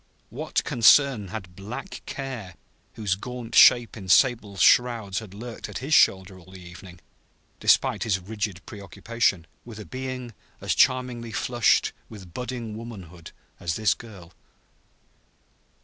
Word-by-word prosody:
What -, -, -2 dB
concern 120 Hz, -2 st, +4 dB
had 95 Hz, -2 st, -8 dB
Black 120 Hz, -, -8 dB
Care, 125 Hz, -10 st, -6 dB, 0.4 s
whose 105 Hz, -4 st, -1 dB
gaunt 120 Hz, +3 st, -7 dB
shape 120 Hz, -2 st, +6 dB
in 95 Hz, -4 st, -9 dB
sable 110 Hz, -3 st, +3 dB
shrouds 115 Hz, -3 st, +3 dB
had 105 Hz, -4 st, -12 dB
lurked 115 Hz, +2 st, -8 dB
at -, -, -6 dB
his 140 Hz, +4 st, -3 dB
shoulder 95 Hz, -6 st, +3 dB
all 90 Hz, +1 st, -17 dB
the 95 Hz, -, -12 dB
evening, 90 Hz, 0 st, -13 dB, 0.6 s
despite -, -, +3 dB
his 105 Hz, -5 st, +1 dB
rigid 100 Hz, -1 st, -5 dB
preoccupation, 100 Hz, -1 st, -2 dB, 0.2 s
with 115 Hz, -3 st, -11 dB
a 105 Hz, -, -8 dB
being 130 Hz, +3 st, -6 dB, 0.3 s
as -, -, -1 dB
charmingly 125 Hz, -3 st, +1 dB
flushed 120 Hz, +1 st, +1 dB, 0.2 s
with 95 Hz, -6 st, -12 dB
budding 120 Hz, -1 st, -5 dB
womanhood 95 Hz, -8 st, -10 dB, 0.3 s
as 85 Hz, -2 st, -3 dB
this 110 Hz, -3 st, +2 dB
girl? 95 Hz, -7 st, -13 dB
110 Hz, 135 wpm, -25 LUFS, 95-120 Hz, 0.6 s, shape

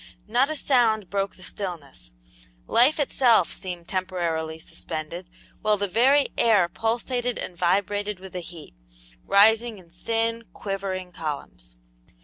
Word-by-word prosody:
Not 245 Hz, +6 st, +3 dB
a 310 Hz, -, -2 dB
sound 225 Hz, -9 st, +2 dB
broke 200 Hz, -1 st, -1 dB
the 185 Hz, -, -15 dB
stillness; 165 Hz, -, -6 dB, 0.5 s
life 255 Hz, +7 st, +4 dB
itself 245 Hz, -, +3 dB
seemed 175 Hz, -3 st, -6 dB
temporarily 170 Hz, -4 st, -2 dB
suspended, 165 Hz, +2 st, -6 dB, 0.3 s
while 215 Hz, -1 st, +2 dB
the 200 Hz, 0 st, -1 dB
very 265 Hz, +8 st, +4 dB
air 210 Hz, -6 st, +5 dB
pulsated 240 Hz, +5 st, -1 dB
and 180 Hz, -, -5 dB
vibrated 200 Hz, +3 st, 0 dB
with 190 Hz, 0 st, -11 dB
the 180 Hz, -, -3 dB
heat, 170 Hz, -2 st, -10 dB, 0.5 s
rising 220 Hz, +3 st, +4 dB
in 175 Hz, -3 st, -16 dB
thin, 230 Hz, +5 st, -2 dB
quivering 190 Hz, -2 st, -4 dB
columns. 140 Hz, -, -6 dB
195 Hz, 125 wpm, -25 LUFS, 175-230 Hz, 0.5 s, air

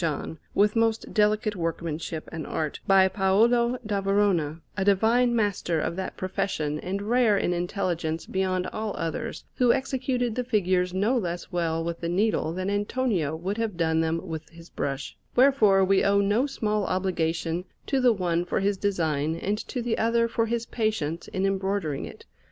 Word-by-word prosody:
John, 160 Hz, 0 st, -2 dB, 0.2 s
with 210 Hz, +1 st, +3 dB
most 225 Hz, -1 st, +1 dB
delicate 210 Hz, 0 st, +2 dB
workmanship 165 Hz, -2 st, -3 dB
and 160 Hz, -2 st, -5 dB
art, 155 Hz, -2 st, -3 dB
by 195 Hz, -1 st, +6 dB
Paolo 230 Hz, +6 st, +3 dB
da 205 Hz, -2 st, -1 dB
Verona, 195 Hz, -6 st, +1 dB, 0.2 s
a 190 Hz, -, 0 dB
divine 225 Hz, +5 st, +3 dB
master 200 Hz, -6 st, 0 dB
of 165 Hz, -, -2 dB
that 190 Hz, 0 st, -5 dB
profession 155 Hz, -5 st, -2 dB
and 195 Hz, +4 st, -3 dB
rare 230 Hz, -1 st, +3 dB
in 180 Hz, -, +1 dB
intelligence 175 Hz, -3 st, -2 dB
beyond 185 Hz, -1 st, -1 dB
all 215 Hz, -1 st, -3 dB
others, 165 Hz, -1 st, -4 dB
who 245 Hz, -2 st, +5 dB
executed 255 Hz, -2 st, -1 dB
the 250 Hz, -, -1 dB
figures 185 Hz, -6 st, +1 dB
no 205 Hz, +7 st, +1 dB
less 175 Hz, -7 st, -3 dB
well 165 Hz, -2 st, 0 dB
with 170 Hz, 0 st, -4 dB
the 170 Hz, -, -2 dB
needle 185 Hz, -3 st, +1 dB
than 185 Hz, +2 st, -3 dB
Antonio 205 Hz, -, 0 dB
would 190 Hz, +7 st, -3 dB
have 220 Hz, -6 st, -2 dB
done 160 Hz, -1 st, +2 dB
them 165 Hz, +2 st, -1 dB
with 160 Hz, -1 st, -6 dB
his 165 Hz, 0 st, -15 dB
brush; 140 Hz, 0 st, -4 dB, 0.2 s
wherefore 225 Hz, -8 st, +5 dB
we 195 Hz, 0 st, +3 dB
owe 200 Hz, 0 st, +4 dB
no 205 Hz, +7 st, +2 dB
small 215 Hz, -6 st, -1 dB
obligation 170 Hz, -2 st, -1 dB, 0.2 s
to 270 Hz, -2 st, +1 dB
the 250 Hz, -1 st, +5 dB
one 175 Hz, -5 st, 0 dB
for 175 Hz, -, -1 dB
his 200 Hz, 0 st, +1 dB
design 160 Hz, -6 st, 0 dB
and 205 Hz, +5 st, -2 dB
to 250 Hz, -3 st, -3 dB
the 235 Hz, -1 st, -1 dB
other 230 Hz, +1 st, +2 dB
for 230 Hz, 0 st, 0 dB
his 235 Hz, 0 st, -1 dB
patience 210 Hz, -10 st, -2 dB
in 190 Hz, +1 st, -2 dB
embroidering 195 Hz, -6 st, -1 dB
it. -, -, -11 dB
195 Hz, 175 wpm, -26 LUFS, 170-220 Hz, 0.2 s, by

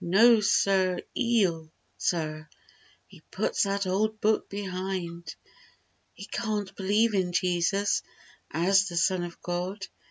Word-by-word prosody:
No 220 Hz, +7 st, +6 dB
sir 190 Hz, -3 st, +2 dB
eel 185 Hz, -10 st, +1 dB, 0.2 s
Sir! 155 Hz, -2 st, -2 dB, 0.6 s
He -, -, -17 dB
puts -, -, -1 dB
that 200 Hz, -1 st, 0 dB
old 215 Hz, +4 st, 0 dB
Book 215 Hz, +1 st, +1 dB
behind. 185 Hz, -4 st, -5 dB, 0.8 s
He -, -, -9 dB
"can't" 210 Hz, -4 st, -3 dB
believe 210 Hz, +4 st, +2 dB
in 185 Hz, -3 st, 0 dB
Jesus 180 Hz, +3 st, +1 dB, 0.5 s
As 195 Hz, +4 st, +3 dB
the 175 Hz, -2 st, -5 dB
Son 175 Hz, +1 st, +2 dB
of 175 Hz, -1 st, -8 dB
God. 180 Hz, +3 st, -3 dB
190 Hz, 120 wpm, -27 LUFS, 175-205 Hz, 0.8 s, No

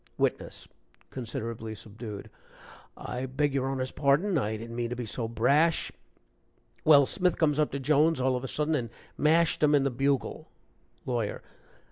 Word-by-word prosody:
WITNESS. -, -, -1 dB, 0.4 s
(Considerably 115 Hz, -2 st, -5 dB
subdued.) 105 Hz, 0 st, -8 dB, 0.7 s
"I 125 Hz, +1 st, -4 dB
beg 140 Hz, +2 st, 0 dB
your 135 Hz, -1 st, 0 dB
Honor's 130 Hz, -1 st, -2 dB
pardon 150 Hz, +8 st, +2 dB
I 110 Hz, -7 st, 0 dB
didn't 115 Hz, +1 st, -8 dB
mean 120 Hz, -1 st, -2 dB
to 125 Hz, -, -3 dB
be 125 Hz, -1 st, -4 dB
so 115 Hz, +2 st, -3 dB
brash. 140 Hz, +9 st, +2 dB, 0.9 s
Well, 145 Hz, -3 st, +7 dB
Smith 180 Hz, +3 st, 0 dB
comes 150 Hz, -3 st, +2 dB
up 150 Hz, -, +2 dB
to 140 Hz, -, -2 dB
Jones 150 Hz, +2 st, +3 dB
all 130 Hz, 0 st, +2 dB
of 125 Hz, -, -3 dB
a -, -, -3 dB
sudden 150 Hz, +4 st, -1 dB
and 120 Hz, -6 st, -1 dB, 0.3 s
mashed 165 Hz, +2 st, +3 dB
him 150 Hz, -1 st, +5 dB
in 140 Hz, -, +3 dB
the 135 Hz, -, +1 dB
bugle 135 Hz, +2 st, -1 dB, 0.3 s
" -, -, -37 dB
LAWYER. 120 Hz, -5 st, -2 dB
135 Hz, 165 wpm, -28 LUFS, 115-150 Hz, 0.9 s, Well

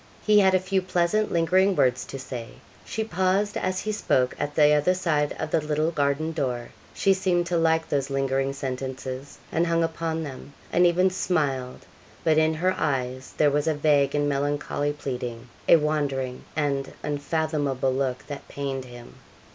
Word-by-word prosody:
He 210 Hz, -1 st, +6 dB
had 190 Hz, -1 st, +5 dB
a -, -, +4 dB
few 190 Hz, +1 st, 0 dB
pleasant, 185 Hz, +4 st, +1 dB
lingering 185 Hz, +3 st, +3 dB
words 125 Hz, -5 st, +2 dB
to 135 Hz, -, -7 dB
say. 125 Hz, -3 st, -6 dB, 0.4 s
She 220 Hz, -, -3 dB
paused 190 Hz, +1 st, 0 dB
as 185 Hz, 0 st, -1 dB
he 215 Hz, -, -2 dB
spoke 130 Hz, -11 st, +1 dB
at 145 Hz, 0 st, -3 dB
the 150 Hz, -1 st, +6 dB
other 150 Hz, +5 st, +3 dB
side 155 Hz, -5 st, 0 dB
of 155 Hz, -, -4 dB
that 160 Hz, -, +2 dB
little 155 Hz, +2 st, +1 dB
garden 145 Hz, +1 st, 0 dB
door. 125 Hz, -6 st, -2 dB, 0.2 s
She 195 Hz, -, +3 dB
seemed 185 Hz, -2 st, +1 dB
to 170 Hz, 0 st, 0 dB
like 160 Hz, 0 st, +2 dB
those 140 Hz, -1 st, -1 dB
lingering 135 Hz, 0 st, 0 dB
sentences 130 Hz, 0 st, -5 dB
and 170 Hz, +2 st, +1 dB
hung 165 Hz, 0 st, +2 dB
upon 165 Hz, 0 st, -2 dB
them 140 Hz, -1 st, -9 dB, 0.2 s
and 180 Hz, 0 st, +5 dB
even 180 Hz, +2 st, +3 dB
smiled 140 Hz, -9 st, -1 dB, 0.4 s
but 155 Hz, -1 st, +4 dB
in 160 Hz, 0 st, +2 dB
her 185 Hz, +4 st, +1 dB
eyes 130 Hz, -3 st, -2 dB
there 150 Hz, -1 st, +4 dB
was 145 Hz, +2 st, 0 dB
a 160 Hz, -, +2 dB
vague 145 Hz, -2 st, +2 dB
and 145 Hz, 0 st, +1 dB
melancholy 145 Hz, +1 st, -1 dB
pleading 125 Hz, -4 st, -5 dB, 0.2 s
a -, -, +10 dB
wandering 145 Hz, -5 st, -1 dB
and 140 Hz, -3 st, -1 dB
unfathomable 145 Hz, -3 st, -1 dB
look 130 Hz, -1 st, -2 dB
that 145 Hz, -2 st, -8 dB
pained 135 Hz, -2 st, -4 dB
him. 120 Hz, -1 st, -12 dB
150 Hz, 170 wpm, -25 LUFS, 135-170 Hz, 0.4 s, a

